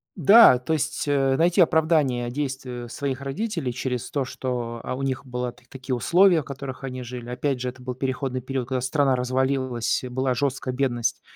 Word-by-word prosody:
Да. 200 Hz, -, +8 dB
То 125 Hz, +6 st, -2 dB
есть, 155 Hz, 0 st, -2 dB
э, 135 Hz, -2 st, +2 dB
найти 175 Hz, +4 st, +4 dB
оправдание 155 Hz, -7 st, +2 dB
действию 130 Hz, -3 st, -4 dB
своих 135 Hz, +1 st, -3 dB
родителей 145 Hz, -, -3 dB
через 125 Hz, -1 st, -3 dB
то, 140 Hz, -3 st, -1 dB
что, 120 Hz, -3 st, -4 dB
а, -, -, -3 dB
у 135 Hz, -, -5 dB
них 135 Hz, 0 st, -2 dB
была 125 Hz, -1 st, -3 dB
так 125 Hz, 0 st, -24 dB
такие 130 Hz, -1 st, -4 dB
условия, 175 Hz, +6 st, +4 dB
в -, -, -13 dB
которых 135 Hz, -1 st, -7 dB
они 130 Hz, -1 st, -5 dB
жили. 120 Hz, 0 st, -7 dB
Опять 130 Hz, +1 st, -2 dB
же, 125 Hz, -, -1 dB
это 130 Hz, +1 st, -12 dB
был 125 Hz, 0 st, -4 dB
переходный 130 Hz, 0 st, -2 dB
период, 130 Hz, -1 st, -3 dB
когда 130 Hz, -1 st, -1 dB
страна 135 Hz, +1 st, +2 dB
развалилась, 130 Hz, -1 st, 0 dB
и -, -, -4 dB
была 130 Hz, +1 st, 0 dB
жёсткая 130 Hz, 0 st, -2 dB
бедность, 125 Hz, -3 st, -1 dB
130 Hz, 190 wpm, -24 LUFS, 125-140 Hz, -, Да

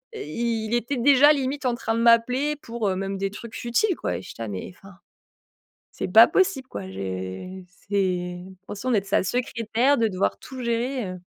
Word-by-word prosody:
heu, -, -, -6 dB
il 225 Hz, +7 st, -2 dB
était 240 Hz, +3 st, -1 dB
déjà 280 Hz, +4 st, +6 dB
limite 275 Hz, 0 st, -2 dB
en 240 Hz, -, +1 dB
train 225 Hz, -1 st, -2 dB
de 230 Hz, -, 0 dB
m'appeler 250 Hz, +5 st, +3 dB
pour, 230 Hz, -6 st, -3 dB
heu, 185 Hz, -, -1 dB
même 195 Hz, +1 st, -3 dB
des 195 Hz, 0 st, -1 dB
trucs 230 Hz, +2 st, -9 dB
futiles 255 Hz, -, +1 dB
quoi -, -, -3 dB
et -, -, -7 dB
j'étais 150 Hz, -, -10 dB
là: -, -, -4 dB
«Mais 95 Hz, -, -6 dB
enfin, 195 Hz, +1 st, -15 dB, 1.0 s
c'est -, -, -4 dB
pas -, -, +9 dB
possible 370 Hz, -9 st, +1 dB
quoi! 95 Hz, -2 st, -6 dB
J'ai 95 Hz, -, -6 dB, 0.2 s
c'est 180 Hz, -3 st, -1 dB, 0.3 s
fonction 210 Hz, +5 st, -3 dB
d'être 205 Hz, -4 st, +1 dB
sa 200 Hz, -, +2 dB
secrétaire 240 Hz, +4 st, +1 dB
de 230 Hz, -2 st, +2 dB
devoir 190 Hz, -2 st, -1 dB
tout 260 Hz, -1 st, -9 dB
gérer, 235 Hz, 0 st, -1 dB
heu» 185 Hz, -, -6 dB
230 Hz, 190 wpm, -24 LUFS, 190-255 Hz, 1.0 s, pas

